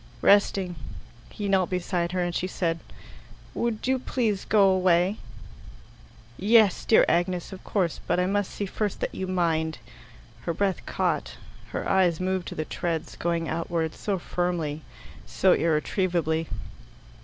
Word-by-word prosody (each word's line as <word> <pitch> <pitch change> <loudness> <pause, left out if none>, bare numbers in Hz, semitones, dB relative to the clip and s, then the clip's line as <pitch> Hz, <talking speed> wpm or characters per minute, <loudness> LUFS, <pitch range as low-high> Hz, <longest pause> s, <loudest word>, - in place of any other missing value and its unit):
"Resting." 195 -3 +3 0.5
He 205 - -5
knelt 190 -2 +2
beside 175 -1 -1
her, 180 -1 +1
and 175 0 -2
she 180 - -1
said, 165 -3 -1 0.7
"Would 235 -2 -2
you 260 0 +2
please 225 -6 -1
go 205 -2 +5
away?" 185 +1 +3 1.2
"Yes, 215 -1 +4
dear 220 - +6
Agnes, 175 +1 0
of 185 - -10
course; 180 -6 -1
but - - +2
I 180 - +2
must 200 +1 0
see 205 - -4
first 205 +1 -3
that - - -2
you 190 - -4
mind." 165 -3 0 0.6
Her 165 +6 -3
breath 195 0 0
caught. - - -1 0.3
Her - - -4
eves 180 -4 +3
moved 185 -1 -1
to - - -6
the 155 - -2
treads, 165 -1 -3
going 170 -1 -1
outwards, 165 -1 -2
so 200 -2 -1
firmly, 170 -4 -2 0.5
so - - +3
irretrievably. 165 0 0
180 Hz, 145 wpm, -26 LUFS, 170-195 Hz, 1.2 s, dear